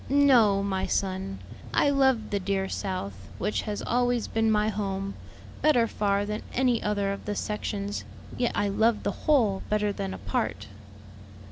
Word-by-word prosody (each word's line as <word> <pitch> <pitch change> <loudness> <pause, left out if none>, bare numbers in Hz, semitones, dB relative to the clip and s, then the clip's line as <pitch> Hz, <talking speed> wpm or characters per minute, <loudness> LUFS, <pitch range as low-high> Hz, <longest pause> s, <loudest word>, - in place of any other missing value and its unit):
"No, 245 -8 +5
my 190 -1 -1
son. 195 0 -1 0.4
I 285 - +4
love 265 -5 +2
the 200 - +1
dear 195 0 -1
South, 185 - -3 0.2
which 210 - -1
has 205 - -3
always 245 -1 +1
been 225 0 +1
my 210 0 +3
home, 195 -2 -3 0.5
better 270 -7 +4
far 205 -2 0
than 210 +1 -3
any 250 -2 +2
other 205 -1 0
of 200 - -8
the 205 - -2
sections; 205 -1 -3 0.3
yet 245 - 0
I 205 - +1
love 220 +2 +2
the - - 0 0.2
whole 225 -10 +4
better 210 -1 +1
than 95 - -4
a - - -7
part." - - -2
210 Hz, 160 wpm, -27 LUFS, 195-230 Hz, 0.5 s, No